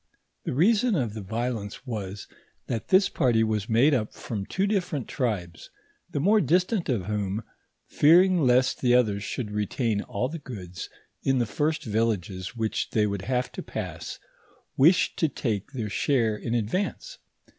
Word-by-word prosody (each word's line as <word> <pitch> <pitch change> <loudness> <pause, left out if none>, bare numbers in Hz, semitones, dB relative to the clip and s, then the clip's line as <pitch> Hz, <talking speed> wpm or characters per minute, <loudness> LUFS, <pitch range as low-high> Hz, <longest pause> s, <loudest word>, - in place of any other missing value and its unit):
The - - -2
rear 180 - +5
Bon 245 -4 +1
of 120 - -1
the 110 - -6
violence 110 +2 -4
was, 105 -5 -5 0.4
that 115 -3 -3
this 190 +1 +5
party 115 -3 +2
was 110 0 -1
made 125 +7 +4
up 110 -5 0
from 100 -4 -5
two 195 - 0
different 180 - -1
tribes, 95 -9 -3 0.4
the - - -2
more 205 +8 +4
distant 185 +1 +1
of 110 -8 0
whom, 105 0 -2 0.4
fearing 175 +4 +5
leat 125 -1 +3
the 125 -1 +4
others 105 -5 +2
should 105 0 -4
retain 105 +1 -1
all 105 +5 -2
the 165 +4 -6
goods 90 - -8 0.3
in 135 -1 +2
the 120 - +2
first 150 +8 -1
villages 105 -3 -1
which 110 -1 -1
they 105 -1 +2
would 100 -2 -2
have 125 0 -1
to - - -6
pass, - - -6 0.6
wished 165 +7 +4
to 160 - +2
take 110 -5 -3
their 120 -6 -3
share 115 0 +1
in 115 +2 -3
advance. 185 - -2
120 Hz, 165 wpm, -26 LUFS, 105-145 Hz, 0.6 s, rear